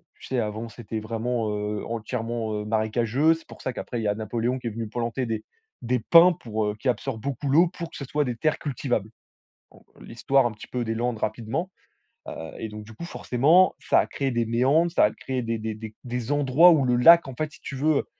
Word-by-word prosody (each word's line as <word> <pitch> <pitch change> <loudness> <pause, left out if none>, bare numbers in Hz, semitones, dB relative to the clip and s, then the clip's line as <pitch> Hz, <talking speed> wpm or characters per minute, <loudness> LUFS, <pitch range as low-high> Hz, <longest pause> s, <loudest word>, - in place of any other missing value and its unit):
tu - - -14
sais? 130 - -1
Avant, 110 +1 -3
c'était 110 -1 -6
vraiment, 115 +1 -2
heu, 105 0 -3
entièrement, 115 -1 -3
heu, 105 0 -3
marécageux. 115 +7 +2
C'est 165 - -10
pour - - -13
ça 130 - -3
qu'après, 120 0 -5
il - - -3
y - - 0
a 105 - +1
Napoléon 115 +4 -2
qui 120 - -5
est - - 0
venu 115 0 -5
planter 120 +3 -2
des 110 -2 -3 0.4
des 125 +2 0
des - - -4
pins 170 +9 +7
pour 110 -6 -3
heu 105 - -2
qui 130 - -1
absorbent 125 -2 -2
beaucoup 140 +1 -4
l'eau 165 +6 +5
pour 170 -2 -7
que - - -14
ce 140 - -6
soit 150 +3 0
des 125 -2 -2
terres 155 +6 0
cultivables. 125 -6 -2 0.6
Bon, - - -20 0.2
l'histoire 135 +3 +1
un 120 - 0
petit 110 - -12
peu 125 -1 -3
des 115 - -1
Landes 120 0 -1
rapidement. 115 - -3 0.6
Heu - - -5 0.3
et 110 - -4
donc, 105 0 -8
du 110 - -12
coup, 140 - -9
forcément, 160 +6 +3
ça - - +3
a - - +1
créé 135 -1 -2
des 120 -1 0
méandres, 135 +9 +2
ça 165 - +4
a 105 - +1
créé 130 +2 -4
des 115 -1 -2
des 110 0 -3
des 110 0 -9
des 125 +1 -3
endroits 145 +4 +5
où 145 -5 +3
le 125 -1 +2
lac, 165 +6 +7
en 130 - -6
fait, 155 +3 -3
si - - -16
tu 140 - -6
veux, 150 +3 +2
heu, - - -1
120 Hz, 245 wpm, -25 LUFS, 110-140 Hz, 0.6 s, pins